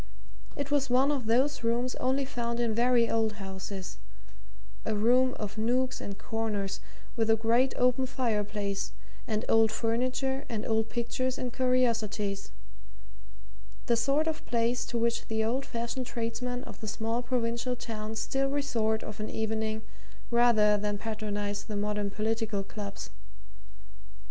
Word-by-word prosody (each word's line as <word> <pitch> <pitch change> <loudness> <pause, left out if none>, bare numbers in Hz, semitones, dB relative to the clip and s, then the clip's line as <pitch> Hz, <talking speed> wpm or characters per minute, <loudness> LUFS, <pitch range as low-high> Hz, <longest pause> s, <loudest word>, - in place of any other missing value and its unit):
It 285 0 -3
was 280 -2 +2
one 260 +3 +4
of 265 -6 -1
those 265 +3 +2
rooms 240 +2 +1
only 265 +2 +1
found 235 -2 -2
in 235 -2 +1
very 240 0 +4
old 225 -1 +1
houses 190 - -6 0.8
a - - 0
room 250 +4 +4
of 210 0 -4
nooks 250 +3 +1
and 200 -1 -5
corners, 210 -3 -2 0.4
with 225 -1 +1
a 225 - +7
great 230 +4 +2
open 250 +1 +3
fireplace, 210 -5 -1 0.3
and 215 0 -1
old 225 -1 +5
furniture 255 +4 0
and 220 -2 -2
old 220 0 +1
pictures 255 +2 -1
and 245 -2 -3
curiosities 230 -6 +1 1.4
the 235 - +3
sort 275 +6 +2
of 320 -1 -2
place 235 0 +1
to 235 - -2
which 235 0 0
the 220 0 +1
old 255 +5 0
fashioned 235 +2 -3
tradesmen 245 +2 -2
of - - -9
the 220 - -5
small 225 +3 -1
provincial 240 0 0
towns 220 -2 -4
still 270 +4 0
resort 230 -6 0
of 215 0 -7
an 215 - -3
evening 220 0 -1 0.5
rather 225 -3 +5
than 205 0 -1
patronize 205 -1 -3
the 215 -2 -4
modern 210 0 0
political 220 -1 -1
clubs. 200 - -6
230 Hz, 145 wpm, -30 LUFS, 215-250 Hz, 1.4 s, a